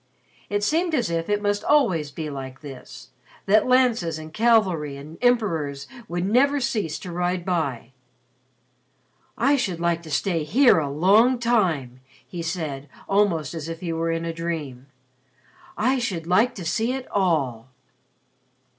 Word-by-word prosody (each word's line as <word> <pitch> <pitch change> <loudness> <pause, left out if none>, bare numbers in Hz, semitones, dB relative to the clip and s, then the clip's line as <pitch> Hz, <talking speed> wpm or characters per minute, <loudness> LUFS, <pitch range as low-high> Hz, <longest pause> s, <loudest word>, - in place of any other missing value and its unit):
It 205 0 -1
seemed 330 - +1
as 240 - 0
if 165 +1 -2
it 205 0 0
must 205 0 0
always 205 - +2
be 155 +2 -6
like 135 -1 -8
this 135 -4 -11 0.4
that 210 +4 +4
lances 240 -11 +2
and 155 0 -10
cavalry 190 -11 +2
and 150 +4 -11
emperors 165 - 0 0.2
would 175 +1 -2
never 275 +7 +3
cease 210 - -2
to 180 - -8
ride 175 0 -2
by. 140 -10 -2 1.5
"I 275 +5 +3
should 190 -10 -2
like 170 0 0
to 165 - -11
stay 165 +2 0
here 245 - +4
a 145 -3 -2
long 205 - +4
time," 180 - 0 0.3
he 175 - -6
said 155 -5 -4 0.2
almost 190 -8 +1
as 165 -1 -6
if 165 0 -7
he 170 -2 -3
were 165 +1 -1
in 165 0 -2
a 165 - -3
dream. 155 -6 -5 0.9
"I 255 +4 +2
should 185 -9 -3
like 220 +8 +2
to 180 - -7
see 225 +8 0
it 265 -1 -5
all." 145 - 0
170 Hz, 155 wpm, -24 LUFS, 155-220 Hz, 1.5 s, that